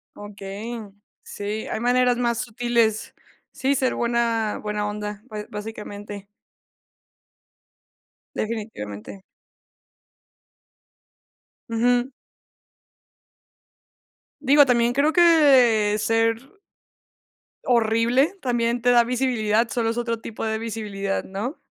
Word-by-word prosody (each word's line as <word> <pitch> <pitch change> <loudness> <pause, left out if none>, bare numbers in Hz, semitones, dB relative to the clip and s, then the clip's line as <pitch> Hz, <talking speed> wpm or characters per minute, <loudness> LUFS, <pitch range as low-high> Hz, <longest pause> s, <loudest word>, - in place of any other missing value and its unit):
Okey. 205 +3 -7 0.4
Sí, 210 +2 -5
hay - - -3
maneras 245 +1 +2
más 235 -1 0
sutiles, 235 -2 0 0.4
sí, 270 +1 0
ser 260 -2 0
buena 235 -2 0
buena 210 0 -2
onda, 210 0 -5
bas 215 -4 -7
básicamente. 205 -1 -8 2.1
Definitivamente. 195 - -6 2.5
Ujú. 245 +3 +1 2.3
Digo, 290 0 +5
también 240 -2 +2
creo 290 +4 +2
que 265 - +5
ser 225 - 0 1.1
horrible 235 - +2
también 240 -1 0
te 245 +1 +3
da 240 -1 +5
visibilidad, 235 -3 +1
solo 230 -2 0
es 230 - -6
otro 230 -1 -2
tipo 225 -1 -7
de 220 0 -1
visibilidad, 205 -3 -3
¿no? 210 - -6
230 Hz, 90 wpm, -23 LUFS, 210-245 Hz, 2.5 s, Digo